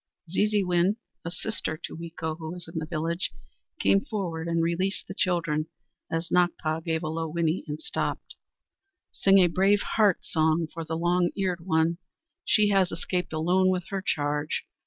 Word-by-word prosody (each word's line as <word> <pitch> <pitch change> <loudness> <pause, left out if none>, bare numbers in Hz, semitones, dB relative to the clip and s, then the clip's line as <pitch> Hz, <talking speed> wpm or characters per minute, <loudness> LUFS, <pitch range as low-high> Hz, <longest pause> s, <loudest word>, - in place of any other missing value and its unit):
Zeezeewin, 195 -2 +3 0.3
a 170 - -3
sister 175 -3 -3
to - - -7
Weeko, 160 -1 -4
who 160 -1 -5
was 175 -2 -8
in 165 0 -4
the 155 - -5
village, 165 +2 -1 0.5
came 100 0 +4
forward 170 -6 -3
and 165 0 +1
released 185 +4 -1
the - - -6
children, 165 -5 0 0.4
as 165 +1 -2
Nakpa 165 -3 +1
gave 160 0 -1
a - - -2
low 160 +1 -2
whinny 170 +1 0
and 150 0 -4
stopped. - - -3 0.8
"Sing 195 0 +4
a 185 - +7
Brave 195 +4 +3
Heart 210 -5 +2
song 160 +1 +2
for 165 - -4
the 160 +1 -3
Long 175 +1 +2
Eared 180 -3 -1
One! 165 0 +2 0.4
She 210 -1 +4
has 195 -3 +3
escaped 180 +1 -2
alone 180 +4 +3
with 180 -2 -1
her 195 -1 -2
charge. 150 -3 -1
170 Hz, 165 wpm, -27 LUFS, 160-185 Hz, 0.8 s, a